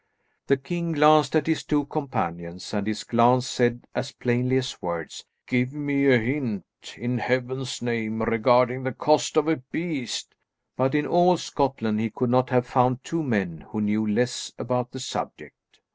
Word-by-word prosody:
The 140 - +4
king 170 +4 -3
glanced 150 -1 +5
at 155 -2 +3
his 160 -1 0
two 145 -1 0
companions, 90 - -4
and 105 -1 -1
his 110 0 -2
glance 120 +2 +4
said 120 -2 0
as 140 - -3
plainly 125 +1 0
as 130 -1 -3
words, 85 -2 -5 0.2
"Give 125 +1 0
me 140 -2 +2
a 125 - +7
hint, 120 - -2 0.3
in 120 0 -2
heaven's 130 +1 -2
name, 110 -2 -2
regarding 125 +3 +3
the 130 -1 -3
cost 150 +5 +2
of 155 0 +3
a 160 -1 +2
beast;" 140 0 -4 0.4
but 130 +2 +1
in 150 - +2
all 175 0 +4
Scotland 130 -9 -1
he 115 +1 0
could 125 +3 -1
not 125 0 +3
have 125 -2 +2
found 125 0 +2
two 165 0 -2
men 95 - -1
who 110 - -5
knew 105 +1 0
less 120 +4 -1
about 125 0 -2
the 130 - -8
subject. 130 - -7
125 Hz, 170 wpm, -25 LUFS, 115-140 Hz, 0.4 s, a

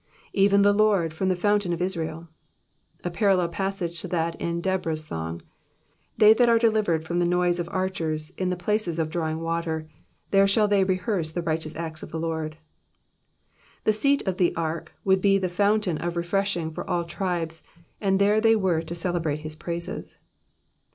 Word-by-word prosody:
^^Even 200 0 +5
the 205 0 +5
Lord, 200 -6 +2
from 190 +4 -1
the 185 - +2
fountain 205 0 +1
of 170 - -3
Israel.'''' 165 -3 -3 0.8
A 175 - -2
parallel 185 -2 +2
passage 175 -1 -3
to - - -5
that 165 -2 -1
in 170 0 -1
Deborah's 170 -4 -1
song: 80 - -5 0.4
*' - - -40
They 215 0 +8
that 240 +1 +4
are 230 - +5
delivered 215 -8 +2
from 175 +2 -1
the - - +3
noise 175 0 +2
of 170 0 -3
archers 165 -4 -2
in 185 0 -2
the 180 - 0
places 180 -1 -1
of 160 -1 -1
drawing 160 -1 -2
water, 165 -1 -2 0.4
there 195 0 +5
shall 210 +2 +3
they 200 -2 +3
rehearse 185 -3 -1
the 175 +1 -3
righteous 160 -1 -2
acts 160 -1 -5
of - - -8
the 160 - -4
Lord." 160 -1 -3 1.3
The 215 - +3
seat 280 +3 +1
of 185 -1 0
the 180 - +2
ark 165 0 -3
would 190 -1 +3
be 195 0 +4
the 190 -1 0
fountain 200 -1 +1
of 175 0 -3
refreshing 175 -1 -1
for - - -6
all 175 - +1
the 170 - -14
tribes, 170 -3 -3 0.4
and 195 -2 +2
there 205 +2 +3
they 225 0 +5
were 185 -6 +1
to 165 +1 -6
celebrate 165 -4 -1
his 155 0 -6
praises. 170 +2 -5
175 Hz, 185 wpm, -25 LUFS, 165-195 Hz, 1.3 s, They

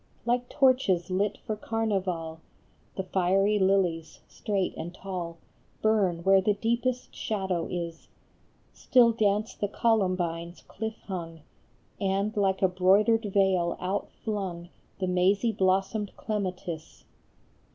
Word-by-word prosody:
Like 245 +1 0
torches 250 -11 +2
lit 200 +2 0
for 215 - -2
carnival, 190 -8 -2 0.6
The 190 - -2
fiery 195 +3 +2
lilies, 180 -5 +1
straight 195 -3 -2
and 170 - -5
tall, 175 -4 -5 0.5
Burn 195 -6 +2
where 195 +1 +5
the 205 +2 +2
deepest 235 +4 -1
shadow 190 -5 -2
is; 170 -2 -5 0.7
Still 240 -3 +4
dance 215 -1 +1
the 205 - -2
columbines 185 -6 0
cliff 220 +1 -5
hung, 165 -4 -6 0.6
And 200 +2 0
like 195 -2 +1
a - - +7
broidered 200 +5 +3
veil 190 -4 +2
outflung 190 -2 -4 0.3
The 190 - -1
mazy 190 +5 +2
blossomed 195 +1 0
clematis. 185 -6 -4
195 Hz, 110 wpm, -28 LUFS, 180-215 Hz, 0.7 s, a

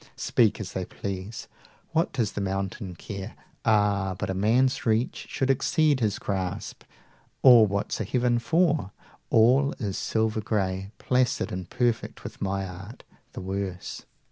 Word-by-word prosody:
95 - - -22
Speak 115 -4 +2
as 105 -3 -5
they 95 - -2
please, 100 +3 -6 0.4
what 165 +2 +1
does 115 -6 0
the 105 - -4
mountain 95 0 -3
care? 100 +2 -7 0.3
Ah, 100 -3 +2
but 95 - -2
a - - -1
man's 115 +7 +2
reach 115 +2 0
should 135 0 +1
exceed 145 +2 +2
his 105 -4 0
grasp, 95 -3 -4 0.6
Or 120 -4 +9
what's 100 +2 -2
a - - +1
heaven 120 +3 +1
for? 155 - +2 0.4
All 130 +5 +4
is 100 -6 -4
silver 110 -1 0
gray 95 -2 -1
Placid 125 -1 +1
and 90 -1 -5
perfect 120 -2 -1
with - - -9
my 95 0 -1
art: 95 +6 -10 0.3
the - - -6
worse! 95 -1 -5
105 Hz, 150 wpm, -26 LUFS, 95-120 Hz, 0.6 s, Or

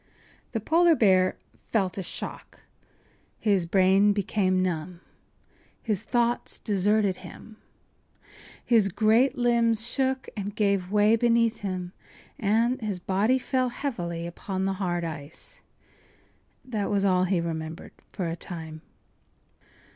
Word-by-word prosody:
” - - -31
The 225 - 0
polar 330 +8 +4
bear 185 -6 +3 0.3
felt 195 -5 +1
a 195 - -3
shock; 180 - -6 0.8
his 195 -5 +1
brain 195 +3 +4
became 195 -2 0
numb; 170 -1 -3 0.8
his 210 -5 -2
thoughts 240 +1 0
deserted 205 -1 +1
him; 220 -1 -12 1.1
his 225 -5 +4
great 220 +7 +2
limbs 235 -2 +2
shook 265 +1 -1
and 205 -1 -5
gave 200 -3 0
way 210 +1 +4
beneath 230 0 +2
him 185 -2 -4 0.5
and 230 +5 +1
his 205 -4 -3
body 200 +8 +1
fell 255 0 0
heavily 175 - -4
upon 190 +2 -4
the 195 - 0
hard 175 -2 -1
ice. 155 -2 -8 1.0
That 215 -6 -2
was 200 -1 +1
all 185 -1 +3
he 185 -1 +1
remembered 160 0 -5 0.2
for 180 - -3
a 165 - -3
time. 160 -3 -8
200 Hz, 125 wpm, -26 LUFS, 180-230 Hz, 1.1 s, polar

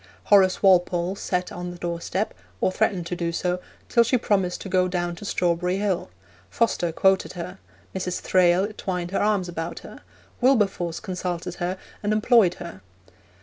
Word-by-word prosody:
Horace 190 -2 +4
Walpole 180 -1 +3
sat 180 -2 -2
on 180 0 -5
the 175 - -8
doorstep 175 +4 -2 0.3
or - - +2
threatened 190 -3 0
to 175 - -3
do 170 -1 -2
so 180 +1 -1 0.3
till 235 - +4
she 255 +2 +2
promised 195 -6 0
to - - -6
go 185 -1 +2
down 175 -1 -2
to 205 - -9
Strawberry 180 -1 0
Hill; 195 -3 -1 0.4
Foster 175 - +1
quoted 190 +3 +2
her; 180 +1 -7 0.4
Mrs. 180 -1 -2
Thrale 185 +3 +3
twined 180 -4 -3
her 195 - 0
arms 205 -3 +1
about 165 -1 -5
her; - - -12 0.4
Wilberforce 195 -9 +2
consulted 180 -1 -4
her 180 +2 -1 0.2
and 210 0 0
employed 215 -4 +4
her. 170 - -9
180 Hz, 160 wpm, -24 LUFS, 175-195 Hz, 0.4 s, Horace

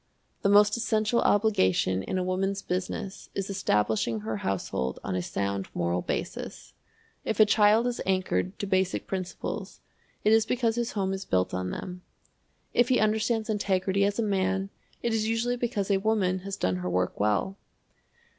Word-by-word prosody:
The 200 - +2
most 205 +2 +5
essential 225 0 +1
obligation 95 - +2
in 185 - -3
a 185 - 0
Woman's 195 +2 -1
Business 190 +2 -4
is 195 0 -2
establishing 110 - 0
her 110 0 -3
household 85 -10 -2
on 95 - -3
a 90 - 0
sound 100 +2 -2
moral 85 +1 0
basis. - - -5 0.5
If 220 - -2
a 215 - +9
child 210 +2 +4
is 245 -1 -2
anchored 190 0 0
to - - -3
basic 190 -1 0
principles, 185 -2 -5 0.4
it 215 - +5
is 220 -1 +4
because 240 -2 +1
his 235 -1 -2
home 195 -2 -1
is 195 0 -4
built 90 - 0
on 95 0 -2
them. 180 - -6 0.7
If 240 0 +3
he 255 - +4
understands 220 +1 +1
integrity 200 -2 +1
as 200 0 +1
a 230 - +1
man, 195 -1 0 0.3
it 235 - 0
is 220 -1 +1
usually 235 +2 0
because 225 -5 -1
a 195 - +4
woman 195 -3 +1
has 195 +1 -6
done 90 0 0
her 90 0 -3
work 90 0 -1
well. 105 - +1
195 Hz, 170 wpm, -27 LUFS, -, 0.7 s, a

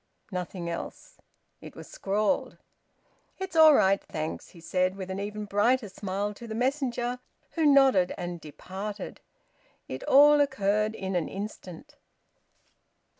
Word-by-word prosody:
Nothing 180 -1 -5
else. 170 0 -7 0.4
It - - -11
was - - -10
scrawled. 210 +7 -1 0.8
"It's 380 -3 -6
all 315 -2 +8
right, 195 -3 +3
thanks," 155 0 -5
he 175 - -16
said, 185 +2 0
with 190 -1 -6
an 190 - -4
even 210 +1 -5
brighter 210 +3 +1
smile 200 +2 -3
to 235 +3 -11
the 220 - -5
messenger, 250 -1 -1 0.3
who 320 -3 +1
nodded 265 -10 +5
and 175 -1 -5
departed. 190 +6 -7 0.7
It 130 - -6
all 295 +2 +7
occurred 215 -5 +1
in 190 -2 -4
an 170 -3 -1
instant. 205 - -8
205 Hz, 130 wpm, -27 LUFS, 185-255 Hz, 0.8 s, all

